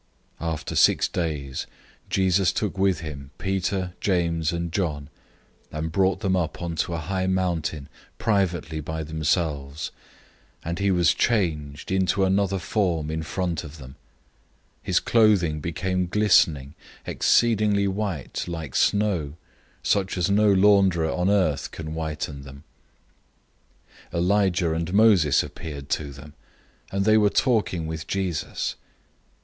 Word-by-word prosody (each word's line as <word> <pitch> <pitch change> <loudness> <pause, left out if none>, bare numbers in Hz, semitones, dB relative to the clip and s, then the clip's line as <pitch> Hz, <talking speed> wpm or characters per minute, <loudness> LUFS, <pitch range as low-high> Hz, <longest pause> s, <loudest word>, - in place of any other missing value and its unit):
009:002 85 - -2
After 80 - -5
six - - +4
days 75 -6 -3 0.4
Jesus 95 -1 +2
took 105 +1 -2
with 95 -4 +1
him 70 -4 -7
Peter, 95 -1 -2
James, 85 -4 +1
and 85 -1 -3
John, 75 -6 -2 0.6
and 80 +1 -4
brought 95 +3 +1
them 95 -3 +1
up 80 -4 -2
onto 85 0 -2
a - - -2
high 95 +4 -2
mountain 85 -6 -1 0.3
privately 90 -7 0
by 80 +1 -4
themselves, 75 -2 -2 0.7
and 85 +2 -3
he 100 0 +1
was 90 -3 +3
changed 80 -11 -1
into 95 +1 +2
another 95 0 +1
form 90 -5 -1
in 80 0 -2
front 85 -1 -2
of 75 +1 -10
them. 65 -2 -11
009:003 - - -17 0.9
His - - +1
clothing 100 -9 +3
became 90 +3 -2
glistening, 85 -8 +3 0.3
exceedingly 105 -4 +2
white, 95 -7 -3
like 80 -6 -5
snow, 95 -9 +1 0.5
such 95 -2 0
as 90 +2 +1
no 105 +1 +4
launderer 95 -4 +4
on 90 +1 +1
earth 90 -8 +1
can 80 -1 -7
whiten 75 -3 -4
them. 70 +1 -12 1.5
009:004 - - -3
Elijah 90 -2 +2
and 85 +2 -3
Moses 100 -10 +5
appeared 75 -4 -8
to 75 -2 -2
them, 70 +2 -12 0.6
and 100 0 0
they 110 0 +5
were 105 -1 +4
talking 105 - +1
with 80 0 -5
Jesus. 95 -5 -2
85 Hz, 130 wpm, -24 LUFS, 80-95 Hz, 1.5 s, Moses